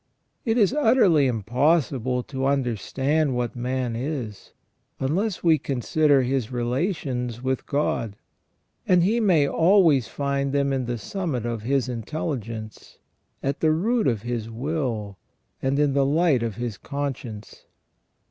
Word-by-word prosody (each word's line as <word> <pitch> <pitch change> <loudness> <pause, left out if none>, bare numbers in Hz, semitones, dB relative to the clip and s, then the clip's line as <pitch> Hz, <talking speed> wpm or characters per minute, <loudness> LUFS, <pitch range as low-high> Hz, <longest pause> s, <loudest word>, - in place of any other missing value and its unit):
It 225 0 +1
is 215 0 +4
utterly 200 - +4
impossible 125 - +1
to 135 0 -3
understand 135 +3 0
what 120 -2 -2
man 125 -1 -2
is, 120 -5 -5 0.5
unless 180 +9 -1
we 160 -3 +4
consider 140 +2 +2
his 130 -2 -1
relations 125 - -2
with 130 -1 -2
God; 120 -7 -1 0.7
and 180 -2 +5
he 220 +6 +2
may 175 -10 +3
always 165 - +4
find 140 -1 -2
them 140 -1 +1
in 130 -2 -1
the 120 0 -2
summit 140 - -3
of 115 -2 -3
his 130 +3 0
intelligence, 115 -3 -5 0.5
at 140 +1 -1
the 160 - +3
root 220 +8 +1
of 115 -4 0
his 120 -2 -3
will, 115 -6 -3 0.4
and 135 +1 0
in 145 -1 +2
the 140 0 +3
light 145 -1 +2
of 115 -3 -2
his 120 -4 -4
conscience. 130 -7 -6
135 Hz, 135 wpm, -24 LUFS, 120-155 Hz, 0.7 s, and